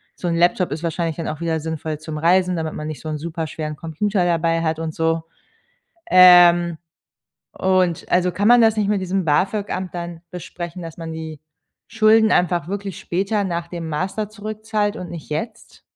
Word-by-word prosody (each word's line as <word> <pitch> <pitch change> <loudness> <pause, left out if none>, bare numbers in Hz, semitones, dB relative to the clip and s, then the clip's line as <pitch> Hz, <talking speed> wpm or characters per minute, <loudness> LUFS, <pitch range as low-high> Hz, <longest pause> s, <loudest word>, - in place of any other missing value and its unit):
So 180 - -5
'n 170 - 0
Laptop 175 0 +2
ist 160 - -6
wahrscheinlich 165 -1 -2
dann 165 - -4
auch 155 - -5
wieder 165 -2 -1
sinnvoll 160 -1 -4
zum 155 0 -6
Reisen, 180 +2 +2
damit 160 -1 -3
man 150 - -5
nicht 155 - -6
so - - -8
'n 155 -1 -3
super 165 +1 -4
schweren 155 0 -5
Computer 180 +4 -1
dabei 165 -1 +1
hat 160 -1 -1
und 160 -1 -4
so. 165 0 0 0.9
Ähm. 175 -2 +7 0.8
Und 185 -3 +1
also, 180 0 +2
kann 205 +4 +1
man 245 0 +7
das 225 -1 +4
nicht 210 -2 0
mit 205 -2 +1
diesem 185 0 -1
BAFÖG-Amt 190 +3 -1
dann 170 -1 -6
besprechen, 175 0 -7
dass 165 -2 -8
man 165 -1 -6
die 160 -2 -7 0.5
Schulden 220 0 +4
einfach 175 -3 +1
wirklich 200 -2 -5
später 200 +4 -1
nach 170 -2 -3
dem 170 -2 -6
Master 190 +7 -2
zurückzahlt 215 0 -3
und 180 - -7
nicht 165 -3 -9
jetzt? 215 +9 -6
175 Hz, 185 wpm, -21 LUFS, 160-195 Hz, 0.9 s, Ähm